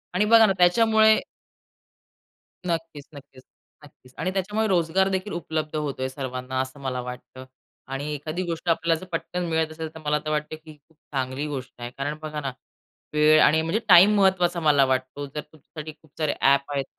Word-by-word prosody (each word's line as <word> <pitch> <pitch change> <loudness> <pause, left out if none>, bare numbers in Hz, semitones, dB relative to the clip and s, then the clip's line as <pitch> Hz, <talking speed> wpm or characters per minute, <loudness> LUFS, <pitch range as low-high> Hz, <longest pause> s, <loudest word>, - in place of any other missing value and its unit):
आणि 205 +3 +3
बघा 225 +1 +7
ना 195 - +2
त्याच्यामुळे 220 +4 +5 1.5
नक्कीच, 165 -4 -4
नक्कीच. 135 -2 -14 0.4
नक्कीच. 130 -3 -19
आणि 180 +4 -2
त्याच्यामुळे 205 +3 -1
रोजगार 185 0 +2
देखील 190 +2 -3
उपलब्ध 155 -2 -4
होतोय 140 -3 -2
सर्वांना 130 -1 -5
असं 130 +2 -7
मला 130 -2 -3
वाटतं. 125 +1 -9 0.4
आणि 135 +3 -4
एखादी 155 +5 -4
गोष्ट 170 0 -4
आपल्याला 165 0 +1
जर - - -10
पटकन 175 +1 -3
मिळत 160 -1 0
असेल 160 0 -6
तर 160 - -8
मला 150 0 +1
तर - - -2
वाटतं 150 +1 -2
की 155 0 -14
ही 150 - -16
खूप 160 - -29 0.2
चांगली 130 +2 -2
गोष्ट 135 -3 -6
आहे 120 - -5
कारण 145 +2 -3
बघा 155 -1 -5
ना 135 -2 -3 0.6
वेळ 150 +1 +5
आणि 160 +1 +4
म्हणजे 165 +7 -1
टाईम 190 +4 +8
महत्त्वाचा 180 -3 +2
मला 150 -4 +4
वाटतो 130 +2 -2
जर 145 +2 -6
तुमच्यासाठी 155 +1 -11
खूप 155 - -24
सारे 155 -2 0
ॲप 140 +1 +3
आहेत 140 -1 -1
155 Hz, 180 wpm, -24 LUFS, 140-175 Hz, 1.5 s, टाईम